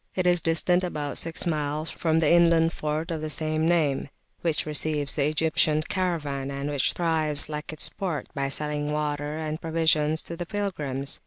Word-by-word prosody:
It 185 - 0
is 175 0 +5
[p.215] - - -28
distant 175 +2 +2
about 150 -5 -3
six 165 +2 -2
miles 155 -1 -1
from 160 -2 0
the 160 -2 +3
inland 170 -1 +5
fort 155 +2 -3
of 160 -2 -3
the 155 - -3
same 155 +1 0
name, 155 -5 +1 0.3
which 165 -3 0
receives 150 -1 0
the 145 -2 +1
Egyptian 155 0 +1
caravan, 150 -8 -2
and 140 +1 -3
which 140 -2 +1
thrives, 155 -4 +2
like 150 +1 -5
its 155 - +2
port, 185 -7 -4
by 140 -2 -1
selling 150 +1 -2
water 150 0 -2
and 155 0 -4
provisions 160 -1 +2
to 170 - -6
pilgrims. 155 -9 -3
155 Hz, 175 wpm, -26 LUFS, 150-165 Hz, 0.3 s, is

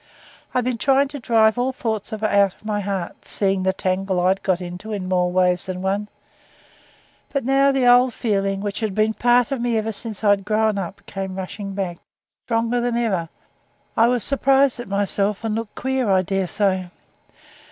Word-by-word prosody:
I'd 250 - +2
been 245 -1 -2
trying 275 +2 +3
to 285 0 -7
drive 225 -1 +3
all 255 +2 +1
thoughts 220 -4 -3
of 215 -1 -5
her 215 - +2
out 200 -2 +3
of - - -25
my 210 -1 -1
heart, 195 -3 -4
seeing 195 -2 0
the 190 0 +2
tangle 190 0 -1
I'd 185 +2 +2
got 185 -3 +1
into 180 +4 -7
in 195 -3 -3
more 180 -1 +1
ways 180 -1 +2
than 185 0 -4
one; 200 +2 -1 1.2
but 275 -4 -2
now 275 +1 +4
the 270 -2 +1
old 245 +1 +6
feeling 195 -4 -1
which 205 0 -3
had 215 -4 -2
been 215 +1 +2
a - - -6
part 245 +3 +3
of 270 -3 -1
me 235 -1 +1
ever 220 +1 -1
since 220 0 -6
I'd 205 -1 +3
grown 215 0 +1
up 190 +1 -7
came 190 -1 -5
rushing 195 +1 -6
back 185 -3 -3 0.5
stronger 230 +1 +1
than 240 -1 0
ever. 190 -9 -1 0.7
I 230 +1 +5
was 245 -3 +1
surprised 275 0 +2
at 240 - -6
myself, 200 +1 -1
and 225 -1 -1
looked 225 -1 -4
queer 265 -3 -1
I 190 -1 +3
daresay. 190 0 -1
210 Hz, 195 wpm, -22 LUFS, 190-240 Hz, 1.2 s, old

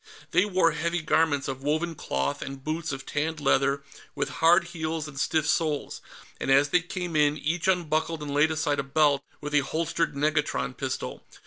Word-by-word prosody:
They 180 - +4
wore 185 -4 +3
heavy 170 0 -2
garments 150 -3 +2
of 135 0 -4
woven 155 +4 0
cloth 70 - -2
and 135 0 -7
boots 160 +2 -2
of 135 0 -6
tanned 155 +2 -2
leather 140 0 +2 0.3
with - - -1
hard 170 +2 +5
heels 160 -2 -3
and 140 -2 -8
stiff 155 0 +1
soles, 155 -3 0 0.4
and - - -3
as 140 +2 +5
they 180 - +3
came 175 -1 -5
in, 150 0 +3
each 160 +5 -1
unbuckled 165 -3 0
and 145 -1 -4
laid 145 +2 +4
aside 155 -2 0
a - - 0
belt 140 0 +2 0.2
with 150 0 -5
a 150 - +6
holstered 165 +2 -1
negatron 145 - 0
pistol. - - -4
155 Hz, 185 wpm, -27 LUFS, 140-165 Hz, 0.4 s, a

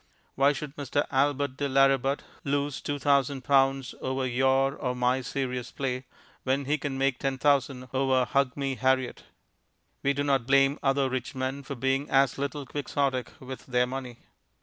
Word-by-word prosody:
Why 140 +1 +4
should 145 -1 -6
Mr. 145 0 -1
Albert 140 0 +1
de 145 -1 -1
Lauributt 135 0 +3 0.2
lose 145 0 -1
two 145 - -2
thousand 140 -1 +1
pounds 135 -1 +2
over 130 0 -1
your 135 +2 +2
or 125 -4 -2
my 125 +1 +1
serious 125 -2 -3
play, 130 -2 -3 0.4
when 135 +1 0
he 150 +2 0
can 135 -1 -3
make 135 -1 +1
ten 135 -1 -1
thousand 135 -2 +1
over 130 -1 +2
Hug 140 0 0
me, 135 -1 -1
Harriet? 130 -1 0 0.8
We 140 - +2
do 140 +1 -1
not 135 -4 +1
blame 135 +1 +4
other 135 0 +2
rich 130 0 -4
men 130 +2 -2
for 140 0 -6
being 135 +3 0
as 135 -1 +3
little 140 0 -3
quixotic 140 -2 -2
with 130 0 -9
their 125 -1 +2
money. 125 -1 -6
135 Hz, 170 wpm, -28 LUFS, 130-140 Hz, 0.8 s, Why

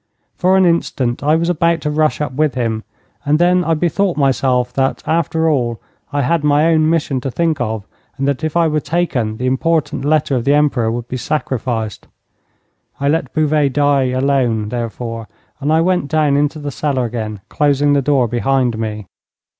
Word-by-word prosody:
For 185 +1 +3
an 190 - +4
instant 135 -8 0
I 150 +2 +3
was 165 +1 0
about 170 -1 +1
to 150 - -2
rush 155 0 +1
up 150 - -2
with 150 -1 0
him, 115 -3 -2 0.4
and 145 +1 +2
then 180 +2 +3
I 165 -1 +1
bethought 175 +3 0
myself 130 -3 +1
that, 135 0 -1
after 160 0 0
all, 120 -7 0 0.3
I 145 -1 0
had 165 +4 +1
my 150 +1 +3
own 155 0 +3
mission 150 -5 0
to 135 - -3
think 160 +1 -1
of, 110 -3 -3 0.3
and 135 0 -1
that 140 +2 -1
if 155 +1 -1
I 170 -1 +4
were 155 -1 0
taken 140 -9 -1
the 125 - -3
important 145 +2 0
letter 145 -1 +1
of 120 - -1
the 140 +3 +3
Emperor 140 -6 +2
would 120 0 -4
be 130 - -4
sacrificed. 120 -6 -3 0.9
I 140 0 +1
let 150 -4 0
Bouvet 150 -3 +2
die 145 -1 +2
alone, 130 -4 0
therefore, 115 -1 -5 0.3
and 145 +1 -1
I 160 +1 +4
went 180 -4 +1
down 150 -1 +2
into 145 +2 +1
the 145 -1 -5
cellar 135 -2 -1
again, 110 -3 -5
closing 145 -1 +2
the 140 - +3
door 135 -3 +2
behind 120 0 0
me. 105 -2 -4
140 Hz, 185 wpm, -17 LUFS, 125-155 Hz, 0.9 s, an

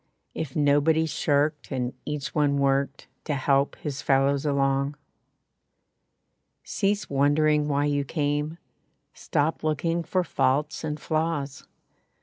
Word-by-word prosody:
If 140 -5 -5
nobody 150 +2 +3
shirked, 150 -1 0
and 125 -2 -2
each 150 -2 -4
one 145 -2 +2
worked 140 0 0 0.2
To 150 - -1
help 140 +1 +1
his 145 -2 -5
fellows 140 +1 +2
along. 140 0 +1 1.7
Cease 200 +1 -1
wondering 150 +2 +2
why 145 0 +1
you 145 -1 +1
came 150 +2 -2 0.6
Stop 150 +3 -1
looking 165 +2 0
for 185 +2 0
faults 145 +1 0
and 150 -1 -3
flaws. 155 -3 -2
145 Hz, 115 wpm, -26 LUFS, 140-155 Hz, 1.7 s, nobody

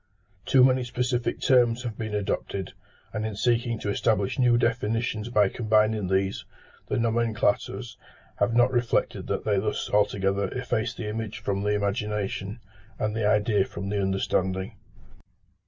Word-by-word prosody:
Too 130 -1 +6
many 130 0 +4
specific 120 0 -1
terms 125 -2 +3
have 115 -3 -4
been 110 -1 -4
adopted; 100 -1 -3 0.4
and 110 -1 -2
in 110 -1 -3
seeking 120 +1 +1
to 100 - -1
establish 100 +1 0
new 120 -2 +4
definitions 115 -1 -1
by 105 -4 +4
combining 110 -1 +1
these, 95 +1 0 0.4
the - - -1
nomenclators 115 -1 0 0.4
have 115 -1 +2
not 120 +1 +5
reflected 120 -2 0
that - - -2
they 105 -2 +2
thus 105 +2 -2
altogether 100 -1 +1
efface 120 -2 -1
the 115 - -5
image 110 0 -4
from 100 -1 -2
the 105 +1 +1
imagination, 100 +1 -2 0.4
and 110 0 -1
the 110 -2 +1
idea 105 -1 +3
from 100 0 -6
the 100 0 0
understanding. 95 -1 -1
110 Hz, 145 wpm, -26 LUFS, 100-120 Hz, 0.4 s, Too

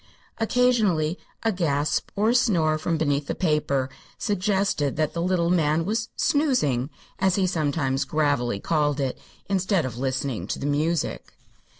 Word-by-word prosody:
Occasionally 220 -9 +2 0.2
a 225 - +2
gasp 150 -6 0
or 210 +2 +2
a - - +1
snore 170 -11 +2
from 165 +1 -1
beneath 145 -2 0
the - - -2
paper 150 -6 +1 0.3
suggested 195 -7 0
that 155 -1 0
the 170 - -2
little 175 -1 +1
man 160 -2 +2
was 225 +3 -1
"snoozing" 200 - +1 0.3
as 190 -1 +3
he 195 - +2
sometimes 145 -5 0
gravely 145 -8 0
called 150 +2 0
it, 135 -2 -2 0.3
instead 190 -3 +1
of 120 -2 -5
listening 130 -7 -2
to - - -2
the - - -5
music. 155 +4 -1
160 Hz, 150 wpm, -25 LUFS, 145-190 Hz, 0.3 s, as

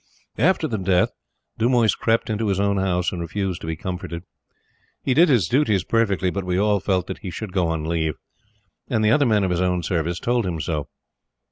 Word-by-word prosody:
After 160 +4 +3
the 110 -6 -3
death, 90 -1 +2 0.5
Dumoise 115 -2 +3
crept 115 0 0
into 110 +1 -1
his 100 -1 0
own 100 0 +1
house 90 -2 0
and 90 - -4
refused 95 +1 -3
to - - -7
be 80 - -2
comforted. 90 0 -5 0.8
He 130 - +1
did 165 +5 +5
his 115 - +3
duties 110 - +2
perfectly, 100 -5 +1
but 100 +1 -3
we 90 0 -1
all 105 +1 +2
felt 95 -2 0
that 95 - -6
he 95 - -6
should 95 +2 -6
go 90 -3 +1
on 80 -1 -2
leave, 80 -2 -1 0.7
and 110 -3 +1
the 105 - +4
other 145 +1 +4
men 105 -3 +3
of 95 - 0
his 90 0 0
own 90 -1 0
Service 85 0 -1
told 120 0 +1
him 85 -3 -3
so. 75 -2 -2
95 Hz, 210 wpm, -23 LUFS, 90-110 Hz, 0.8 s, did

